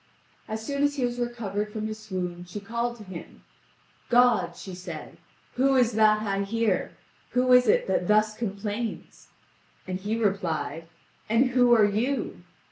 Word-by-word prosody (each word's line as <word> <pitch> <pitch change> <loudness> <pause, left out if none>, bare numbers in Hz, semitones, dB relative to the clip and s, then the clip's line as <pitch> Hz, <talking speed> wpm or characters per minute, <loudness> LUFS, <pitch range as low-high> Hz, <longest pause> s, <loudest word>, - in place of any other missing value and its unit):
As 220 0 -5
soon 280 +2 -2
as 285 0 +2
he 260 -3 0
was 245 0 -3
recovered 210 -4 -3
from 215 0 -4
his 215 0 -5
swoon, 180 -4 -4
she 190 +4 -6
called 235 +3 -3
to 215 - -11
him: 185 -4 -10 0.7
"God," 240 -8 +4
said 190 -2 -8 0.4
she, - - -20 0.4
"who 270 +1 +3
is 245 -2 +4
that 215 -1 +4
I 200 -2 -1
hear? 215 -1 0 0.4
Who 250 0 +4
is 250 -1 +6
it - - +4
that 185 -2 0
thus 215 0 +3
complains?" 210 +1 -5 0.6
And 185 0 -3
he 210 +4 -2
replied: 170 -7 -1 0.4
"And 245 +4 +3
who 245 -1 +5
are 215 -2 +6
you?" 225 +2 -1
215 Hz, 160 wpm, -26 LUFS, 195-240 Hz, 0.7 s, is